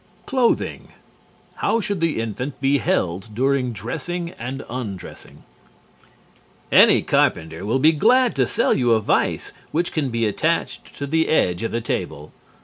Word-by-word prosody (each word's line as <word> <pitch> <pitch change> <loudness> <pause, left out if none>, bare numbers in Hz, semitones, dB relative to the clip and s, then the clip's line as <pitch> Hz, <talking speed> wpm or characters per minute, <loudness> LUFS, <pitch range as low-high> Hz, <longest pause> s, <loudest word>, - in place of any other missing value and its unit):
CLOTHING 255 -4 0 0.7
How 230 - +1
should 200 -3 -2
the 165 -6 0
infant 115 +5 -4
be 140 +1 +2
held 95 0 -1
during 130 0 +1
dressing 165 +10 -5
and 130 +1 -6
undressing? 110 -7 -8 1.3
Any - - +6
carpenter 80 +4 0
will 115 - +2
be 155 +4 +5
glad 240 - +3
to 130 -3 +2
sell - - +1
you 120 -3 +2
a 110 - +3
vise 105 - 0 0.2
which 170 +2 -1
can 150 -4 -1
be 115 -1 0
attached 155 +10 -2
to 140 - -4
the 160 +3 +1
edge 90 - +2
of 115 - -2
the 115 - -2
table. 75 -8 -4
130 Hz, 145 wpm, -22 LUFS, 110-160 Hz, 1.3 s, Any